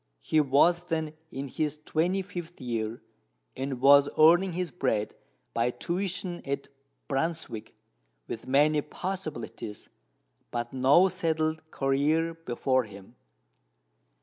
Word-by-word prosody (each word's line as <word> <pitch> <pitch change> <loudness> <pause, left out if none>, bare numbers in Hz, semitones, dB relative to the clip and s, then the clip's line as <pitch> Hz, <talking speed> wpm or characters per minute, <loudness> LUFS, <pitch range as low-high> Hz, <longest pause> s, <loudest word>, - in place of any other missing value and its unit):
He 155 - +3
was 165 +5 +3
then 160 -3 -2 0.2
in 135 +1 -4
his 150 +2 -2
twenty 180 +5 +1
fifth 175 -2 -8
year, 115 -2 -3 0.5
and 135 -1 -3
was 140 +2 +7
earning 175 +4 +6
his 180 0 -2
bread 115 -10 -1 0.4
by 115 +1 +2
tuition 180 +4 -3
at 140 0 -4 0.4
Brunswick, 140 -5 -3 0.5
with 115 +2 -6
many 150 +3 +4
possibilities, 155 - -6 0.6
but 120 0 -4
no 135 +8 +5
settled 160 -2 -1
career 150 +5 +1
before 130 -5 0
him. 100 +2 -13
150 Hz, 110 wpm, -28 LUFS, 130-165 Hz, 0.6 s, was